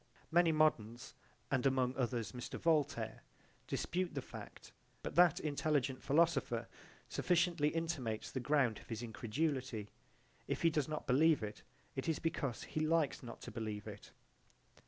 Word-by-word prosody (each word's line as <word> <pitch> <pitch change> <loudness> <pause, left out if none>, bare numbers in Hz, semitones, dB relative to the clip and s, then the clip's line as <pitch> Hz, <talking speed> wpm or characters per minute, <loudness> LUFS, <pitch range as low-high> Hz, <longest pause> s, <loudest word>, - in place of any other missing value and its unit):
Many 170 0 +5
moderns, 125 -7 +1 0.4
and 130 -3 +2
among 130 -1 +2
others 120 -5 -1
Mr. 125 +2 -6
Voltaire, 145 -8 +1 0.5
dispute 180 -2 -1
the 135 - -1
fact, - - -10 0.3
but - - -4
that 175 0 +6
intelligent 145 -3 0
philosopher 140 -7 +2 0.4
sufficiently 170 -3 +2
intimates 150 -10 -2
the 130 - -2
ground 130 -5 +2
of - - -16
his 115 0 -4
incredulity 120 -1 -2 0.6
if - - -2
he 165 - +5
does 150 -3 0
not 155 0 -4
believe 150 +1 +4
it, 105 0 -5 0.3
it 135 +4 -2
is 160 - +1
because 145 -7 -2
he - - -4
likes 155 -2 +2
not 120 -2 -9
to - - -7
believe 105 -2 -4
it. - - -9
140 Hz, 145 wpm, -36 LUFS, 120-160 Hz, 0.6 s, that